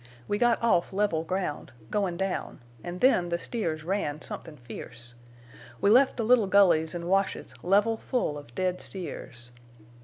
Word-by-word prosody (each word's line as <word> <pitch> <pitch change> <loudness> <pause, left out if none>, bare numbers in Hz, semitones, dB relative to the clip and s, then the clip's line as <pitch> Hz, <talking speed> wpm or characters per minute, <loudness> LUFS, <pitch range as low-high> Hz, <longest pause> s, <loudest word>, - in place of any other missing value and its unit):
We 205 - -1
got 240 -1 +3
off 195 -6 +2
level 195 -5 +1
ground, 180 -3 -3 0.2
goin' 195 -4 0
down, 190 0 -3 0.2
an' 175 +1 -5
then 180 -6 +3
the 170 - 0
steers 165 -7 -3
ran 165 -5 -2
somethin' 155 -2 -5
fierce. 120 0 -10 0.7
We 200 - +3
left 260 +4 +5
the 230 - 0
little 230 -3 +4
gullies 175 -5 +4
an' 170 -1 -4
washes 195 -6 0
level 205 +5 +3
full 240 - -1
of 145 -5 -11
dead 185 -1 -1
steers. 120 -10 -6
185 Hz, 155 wpm, -28 LUFS, 160-205 Hz, 0.7 s, left